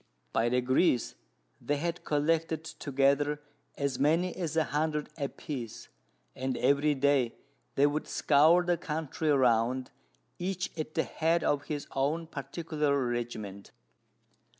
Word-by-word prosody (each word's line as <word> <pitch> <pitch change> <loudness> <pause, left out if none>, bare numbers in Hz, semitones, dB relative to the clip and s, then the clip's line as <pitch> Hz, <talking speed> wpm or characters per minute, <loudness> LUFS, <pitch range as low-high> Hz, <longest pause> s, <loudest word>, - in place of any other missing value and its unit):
By 115 - +2
degrees, 125 +2 +2 0.5
they 145 - 0
had 170 +2 -3
collected 160 +2 0
together 145 -1 +1 0.4
as 140 -2 -1
many 165 +5 +2
as 165 -4 -3
a 160 - +5
hundred 150 +1 -1
a 140 -3 -2
piece, 125 -7 -7 0.5
and 130 0 -2
every 145 +1 +3
day 135 -3 +2 0.4
they 140 - +5
would 145 +1 0
scour 160 +5 +4
the 175 -1 +2
country 155 0 -3
round, 125 -2 +2 0.5
each 185 0 -2
at 155 -1 -5
the - - +2
head 165 +1 0
of 145 0 +1
his 145 -2 -4
own 150 +5 0
particular 150 0 -2
regiment. 110 -5 -4
145 Hz, 125 wpm, -30 LUFS, 135-160 Hz, 0.5 s, a